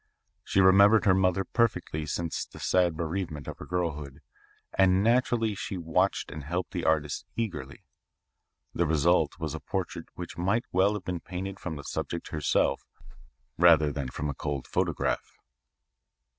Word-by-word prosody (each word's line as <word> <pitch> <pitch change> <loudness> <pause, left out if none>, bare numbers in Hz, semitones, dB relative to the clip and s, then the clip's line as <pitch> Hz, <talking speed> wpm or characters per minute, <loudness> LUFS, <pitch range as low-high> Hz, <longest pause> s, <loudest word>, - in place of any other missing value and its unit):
She 95 - +2
remembered 100 +3 +6
her 95 - +6
mother 95 0 +2
perfectly 95 -9 0
since 85 +2 -2
the - - -13
sad 90 -3 +2
bereavement 80 -3 -3
of - - -7
her - - -9
girlhood 75 -6 -3 0.5
and 95 0 +4
naturally 115 -1 +2
she 95 -1 -5
watched 90 +3 0
and 75 - -7
helped 85 +5 -3
the 90 -4 -3
artist 80 +1 0
eagerly. 80 - -4 0.9
The 85 - +1
result 80 +3 +2
was - - -3
a - - -4
portrait - - -4
which - - -7
might 100 +7 +1
well 95 +3 +3
have 105 - -5
been 90 -2 -2
painted 95 +2 -6
from 80 -3 -5
the 70 - -7
subject 85 +3 -4
herself 75 -3 +1 0.8
rather 80 -4 +6
than 70 -2 -3
from 75 +4 -4
a 70 - -2
cold 70 0 -4
photograph. - - -1
90 Hz, 155 wpm, -28 LUFS, 75-95 Hz, 0.9 s, remembered